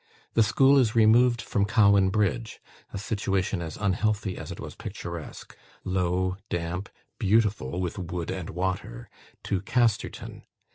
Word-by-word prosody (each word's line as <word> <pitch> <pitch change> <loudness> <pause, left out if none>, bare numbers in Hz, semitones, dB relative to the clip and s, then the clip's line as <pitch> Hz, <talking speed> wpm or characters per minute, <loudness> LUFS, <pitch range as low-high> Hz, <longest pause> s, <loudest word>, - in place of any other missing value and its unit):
The 115 - +4
school 135 +6 +5
is 115 -4 +2
removed 120 +2 +5
from 100 - 0
Cowan 100 -3 +4
Bridge 110 +3 -1 0.3
(a - - -5
situation 100 -2 -1
as 80 -2 -6
unhealthy 105 0 0
as - - -7
it - - -8
was - - -7
picturesque - - -8 0.3
low, 95 0 0
damp, 85 +3 -3 0.3
beautiful 100 -8 +1
with 90 +1 -3
wood 85 -1 -4
and 95 -3 -5
water) 90 -9 -4 0.3
to 95 -2 -1
Casterton. 115 +1 -1
100 Hz, 135 wpm, -27 LUFS, 90-110 Hz, 0.3 s, school